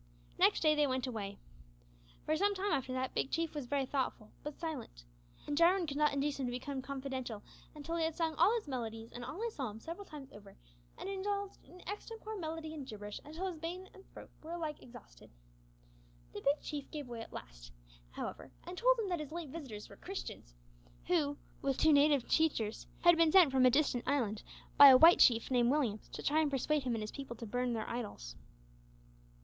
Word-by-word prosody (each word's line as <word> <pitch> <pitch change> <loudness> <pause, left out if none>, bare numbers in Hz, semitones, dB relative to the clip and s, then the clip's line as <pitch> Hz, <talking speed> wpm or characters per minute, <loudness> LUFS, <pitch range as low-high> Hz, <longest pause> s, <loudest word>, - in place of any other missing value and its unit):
Next - - +4
day 310 -1 +5
they 300 -1 +3
went 255 -1 -1
away. 205 -5 -5 0.9
For 310 - +1
some 405 +5 +2
time 395 +1 -1
after 265 -1 0
that 255 0 -2
Big - - -1
Chief 330 -1 -1
was 290 -5 -5
very 275 0 0
thoughtful, 255 -5 -3
but 295 -1 -7
silent, 295 - -6 0.4
and 290 - -2
Jarwin 345 +3 +4
could 285 -3 -4
not 300 0 +3
induce 280 0 -1
him 260 - -1
to - - -2
become 260 +2 -4
confidential 260 -5 -5 0.3
until 320 +3 -4
he 330 - +1
had 320 -1 -1
sung 325 -2 0
all 345 +6 +4
his 450 -8 -3
melodies 225 -4 -5
and 245 - -7
all 305 - -5
his 465 -1 -2
psalms 225 -5 -5
several 345 +5 -7
times 280 -3 -10
over, 200 -1 -14 0.4
and - - -6
had 395 - -3
indulged 400 0 -3
in 360 - -15
extempore 435 +2 -6
melody 320 -3 -5
and 285 -4 -7
gibberish 210 -3 -7
until 315 +5 -6
his 365 -3 -4
brain 355 +4 -5
and 390 - -15
throat - - -12
were 320 +2 -7
alike 315 -3 -4
exhausted. - - -14 1.0
The - - -6
Big 285 +2 +2
Chief 290 -2 -5
gave 295 -4 -6
way 235 -2 -6
at - - -10
last, - - -10 0.4
however, - - -6
and 355 - -7
told - - +4
him 445 -3 -1
that 350 -2 -1
his 300 -1 -6
late 335 -3 -5
visitors 260 -9 -8
were - - -14
Christians, 350 - -7 0.5
who, 295 -5 +1 0.2
with 275 -1 0
two 315 -1 +5
native 285 -3 +4
teachers, 235 -9 +1
had 345 -1 +6
been 330 -1 +5
sent 355 -6 +7
from 260 -1 +5
a - - +7
distant 260 -2 +1
island 230 -7 0 0.4
by 285 - +12
a 260 -2 +10
white 330 +5 +8
chief 230 +1 +5
named 245 -2 +4
Williams, 250 -7 0
to - - -6
try 300 +2 +2
and 310 -2 +2
persuade 285 +1 0
him 245 -2 0
and 220 - -3
his 215 - -5
people 270 -4 -7
to 230 - -8
burn 245 +2 -1
their 220 -1 -3
idols. 205 - -5
285 Hz, 210 wpm, -34 LUFS, 245-330 Hz, 1.0 s, by